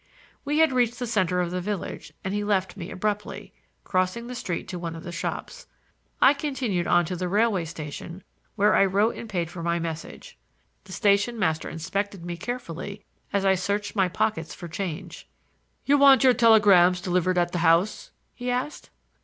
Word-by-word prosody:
We 290 +1 -1
had 320 -1 +5
reached 240 -2 +1
the 250 - -3
center 185 -6 +1
of 175 -1 -2
the 180 0 -2
village, 205 0 -5
and 190 - -3
he 205 0 -1
left 190 -3 0
me 180 -3 -7
abruptly, 210 +2 -4 0.3
crossing 185 +5 -1
the 250 - -7
street 185 -9 -4
to 180 -2 -5
one 165 -1 -5
of 165 - -9
the 175 - -6
shops. - - -5 0.5
I 270 - +7
continued 265 - -2
on 175 0 +4
to 180 - -4
the 180 +1 -3
railway 205 -2 +1
station, 160 +3 -8 0.3
where 210 +2 +3
I - - +5
wrote 200 +4 +2
and 230 - -8
paid 175 -4 -2
for 170 - -7
my 170 0 0
message. 165 -1 -7 0.5
The - - -13
station 205 +3 +2
master 160 -6 0
inspected 185 +2 -4
me 175 0 -4
carefully 200 -1 -6 0.3
as 200 -1 0
I 190 - +5
searched 200 +3 -2
my 190 -3 +2
pockets 170 -3 -2
for 175 - -8
change. 175 0 -6 0.6
"You 285 +1 +4
want 275 -1 +7
your 255 -1 +6
telegrams 205 -6 +5
delivered 180 0 0
at 175 0 +2
the 175 - -2
house?" 175 - +2 0.2
he 245 0 -5
asked. 250 +4 -3
190 Hz, 185 wpm, -25 LUFS, 175-220 Hz, 0.6 s, I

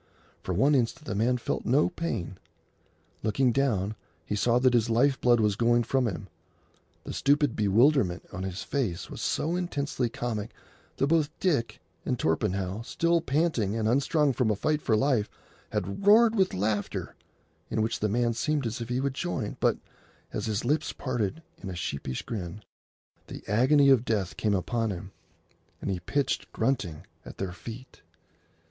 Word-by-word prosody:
For - - -4
one 135 +10 +4
instant 130 +3 0
the 115 - -3
man 115 +5 +2
felt 120 - -3
no 135 +5 +3
pain. 115 - -4 0.8
Looking 120 +4 +2
down, 110 -7 +1 0.3
he - - -2
saw 120 +3 +2
that 125 0 +4
his 120 -1 +2
life 130 +3 +2
blood 120 -1 +4
was 105 -2 +2
going 120 +2 +3
from 130 0 +1
him. 100 - -5 0.8
The - - -6
stupid 145 -2 +2
bewilderment 105 - +3
on 90 - -5
his 95 0 -4
face 115 -12 -2
was - - -7
so 165 +3 0
intensely 145 -8 -1
comic 115 -4 -4 0.4
that - - +2
both 155 0 +2
Dick 145 -11 0 0.2
and - - -1
Torpenhow, 95 +4 -1
still 170 +7 +1
panting 135 - 0
and 110 -1 0
unstrung 140 +4 +2
from 125 -3 +1
a 105 - +2
fight 150 +8 0
for 110 - +2
life, 125 -4 +1 0.4
had 100 - -3
roared 225 +2 +7
with 190 -4 +2
laughter, 105 +2 -2 0.6
in 110 - 0
which 115 +1 -1
the 105 - 0
man 120 +2 +1
seemed 145 +3 0
as 115 +2 -3
if 115 - -5
he 125 +1 0
would 135 0 -1
join, 135 -8 -3
but, - - +2 0.6
as - - -2
his 110 +1 -1
lips 150 +4 0
parted 125 +2 -2 0.2
in 95 - -6
a 90 - -5
sheepish 70 -6 -4
grin, 105 -2 -6 0.6
the - - -8
agony 135 +7 +4
of 130 -4 +5
death 105 -6 -1
came 105 -2 +1
upon 115 +4 -1
him, 95 0 -6 0.7
and - - -3
he 95 - -2
pitched 140 +11 -1
grunting 100 - -1 0.2
at - - -11
their 95 -2 -3
feet. 120 +7 -10
120 Hz, 170 wpm, -28 LUFS, 105-140 Hz, 0.8 s, roared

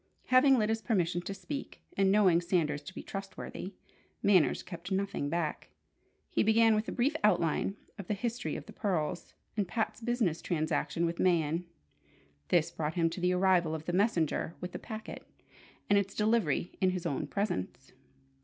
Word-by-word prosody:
Having 260 +1 +6
Lyda's 220 0 +1
permission 180 -6 0
to 195 - -5
speak, 280 +8 -7
and 195 -1 +3
knowing 190 -5 +5
Sanders 165 -4 0
to 190 - -10
be - - -6
trustworthy, 195 -1 -7 0.5
Manners 190 -6 +4
kept 175 +1 -8
nothing 190 -7 -1
back. 165 -1 -2 0.6
He - - +2
began 225 +1 +5
with 215 +1 0
a - - -3
brief 275 +5 +1
outline 195 -1 +2 0.2
of 195 - -7
the 210 - 0
history 235 +3 -3
of - - -6
the - - -12
pearls, 175 -6 -2 0.2
and 205 -3 0
Pat's 220 +3 -2
business 225 -8 0
transaction 165 +1 0
with 170 0 -2
Mayen. 170 -1 +2 0.8
This 170 -1 +2
brought 155 -1 -3
him 165 -2 +2
to 180 - -6
the 180 0 +2
arrival 180 -3 +3
of 160 0 -7
the 175 - -2
messenger 175 -5 +1
with 180 0 -5
the - - -6
packet, 220 -2 -7 0.6
and 200 0 +5
its 200 0 -3
delivery 210 -7 +1
in 185 - +4
his 180 -1 -3
own 145 -5 -1
presence. 135 - -3
185 Hz, 170 wpm, -31 LUFS, 170-215 Hz, 0.8 s, Having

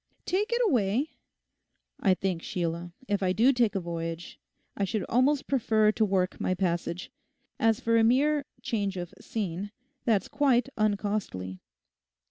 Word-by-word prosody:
'Take 410 +5 0
it 475 - +2
away?' 250 - +1 0.9
'I 190 -3 +3
think, 185 -3 -2
Sheila, 170 0 -3 0.2
if 205 -1 0
I 185 -1 +2
do 245 +7 +5
take 235 -5 +2
a - - +2
voyage 165 -1 -5 0.4
I 200 - -1
should 200 +2 -1
almost 270 +4 +2
prefer 220 -5 +3
to 220 - +1
work 190 -3 0
my 185 - +1
passage. 175 -1 -2 0.5
As 225 -1 +3
for 230 0 +2
a 225 - +5
mere 280 +5 +3 0.2
"change 205 -6 -1
of 175 -1 -5
scene," 200 -2 -3 0.3
that's 215 -5 +2
quite 275 -2 +2
uncostly. 200 - -1
205 Hz, 145 wpm, -28 LUFS, 180-240 Hz, 0.9 s, do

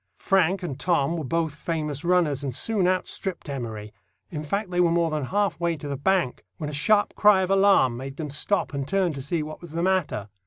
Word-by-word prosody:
Frank 190 0 +2
and 145 -6 -5
Tom 170 -3 +1
were 160 - -3
both 160 +3 -1
famous 150 -1 -4
runners, 170 -6 +2
and 130 -4 -3
soon 200 +2 +1
outstripped 185 0 -2
Emory; 110 -6 -6 0.4
in 150 -3 -4
fact, 195 +6 -3
they 175 - 0
were 175 -1 +4
more 170 -1 +1
than 150 -3 -1
half 200 +5 0
way 170 -1 0
to 145 - -7
the 140 - -3
bank, 170 -1 0
when 150 -1 -4
a - - -10
sharp 205 +8 +2
cry 205 -3 +5
of 185 - -2
alarm 195 -11 +4
made 135 +2 -7
them 150 -3 -5
stop 155 +5 0
and 140 -1 -3
turn 190 -2 +1
to 140 - -6
see 155 +4 -2
what 155 +1 -8
was 170 -3 -10
the 170 +1 -1
matter. 185 - 0
165 Hz, 225 wpm, -25 LUFS, 145-185 Hz, 0.4 s, cry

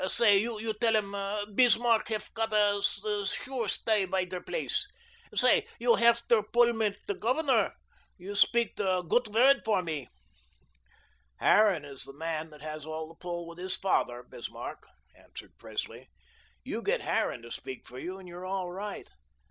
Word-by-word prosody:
Say, 210 -3 +5
you 220 0 -2
tell 225 -2 +4
'um 200 0 -3
Bismarck 235 -1 +4
hef 215 -2 -4
gotta 210 -2 +2 0.5
sure 255 +1 -3
stay 210 0 +2
bei 185 0 0
der 180 0 -6
place. - - -1 0.5
Say, 460 -2 +4
you 470 - +4
hef 235 - +4
der 230 -2 +5
pull 235 +3 +3
mit 215 -3 0
der 200 - -1
Governor. 265 +5 +1 0.4
You 190 +3 -7
speak 235 +2 +3
der 185 -3 +1
gut 240 +8 +2
word 255 +6 +5
for 205 -4 +1
me." 155 -5 -4 1.3
"Harran 200 -8 +4
is 140 -2 -8
the 135 - -10
man 160 +1 -4
that 150 -1 -14
has 155 0 -5
the 160 +1 -6
pull 175 -1 -4
with 170 +1 -11
his 185 +1 -1
father, 125 -10 0
Bismarck," - - -8 0.3
answered - - -12
Presley. - - -6 0.5
"You - - -4
get - - 0
Harran 115 - -1
to 120 - -11
speak 130 - -7
for 125 - -9
you, 185 +5 -5
and 190 -1 -12
you're 175 +1 -9
all 185 -2 -2
right." 200 +3 -6
200 Hz, 160 wpm, -30 LUFS, 175-225 Hz, 1.3 s, Say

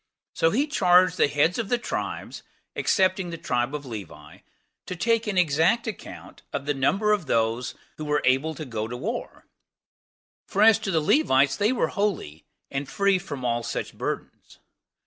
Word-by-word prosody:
So 165 - +2
he 260 - +1
charged 185 - +4
the - - +4
heads 150 +7 +1
of 225 - -3
the 245 - +2
tribes, 235 - -5 0.3
excepting 185 -2 +1
the 165 - -5
tribe 125 -2 -1
of 145 -1 -6
Levi, 105 -8 -9 0.5
to 185 - -4
take 230 +4 +1
an 200 -3 -1
exact 175 +7 +3
account 220 -3 -8
of 140 - -4
the 145 - +1
number 195 +11 +1
of 200 -7 0
those 115 +1 0 0.2
that 155 - -5
were 150 0 0
able 135 +5 +2
to 155 - -6
go 110 -4 -4
to 125 +2 -6
war; 225 - -5 1.0
for 200 +1 +2
as 225 -1 +7
to 215 - -4
the 165 -4 +2
Levites, 135 - +3
they 205 - +2
were 255 - 0
holy, 180 - -3 0.2
and 135 0 -3
free 200 -2 +2
from 145 -9 -6
all 120 0 0
such - - -4
burdens. - - -6
165 Hz, 175 wpm, -25 LUFS, 135-205 Hz, 1.0 s, as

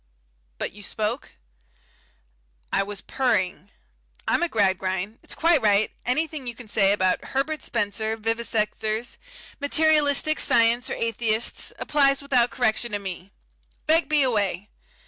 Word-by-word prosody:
"But - - -3
you 205 - -12
spoke?" 215 +5 -3 1.4
"I - - +3
was 200 0 -5
purring. 195 - -1 0.6
I'm - - +2
a 345 - +1
Gradgrind 190 - -1
it's - - -7
quite 330 -3 +3
right 210 0 +3 0.2
anything 295 +1 -1
you 240 - -5
can 240 -1 -12
say 195 -1 +3
about 185 -2 +1
Herbert 280 +2 -2
Spencer, 220 0 -1
vivisectors, 225 0 -2 0.4
materialistic 305 0 +3
Science 235 +2 +3
or - - -3
Atheists, 230 0 -1
applies 275 -2 +2
without 250 -4 +2
correction 235 -2 -1
to - - +1
me. 190 -1 -7 0.5
Begbie 310 -2 +3
away! 205 -5 -1
230 Hz, 125 wpm, -24 LUFS, 205-275 Hz, 1.4 s, I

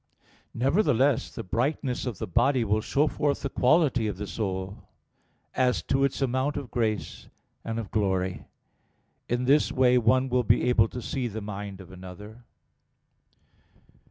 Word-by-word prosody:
Nevertheless 135 - +2
the - - -7
brightness 125 - -1
of 115 -6 -4
the - - -4
body 130 - +2
will 105 0 +1
show 140 +7 +1
forth 145 -2 -1
the 140 - -2
quality 130 -4 +3
of 105 - -4
the 105 - -4
soul; 95 0 -5 0.6
as 125 -1 +1
to 135 - +1
its 140 0 0
amount 130 +3 0
of 140 -4 -6
grace 110 -4 -2 0.4
and 115 0 -4
of 115 -3 -5
glory. 95 -3 -1 0.8
In 120 +1 0
this 145 +3 +3
way 125 -2 +4
one 130 +3 +3
will 125 0 +2
be - - +3
able 115 -3 +4
to 125 +1 -7
see 130 -4 -2
the 110 -1 -5
mind 100 -1 -6
of 95 0 -13
another. 95 +5 -11
120 Hz, 155 wpm, -27 LUFS, 105-130 Hz, 0.8 s, way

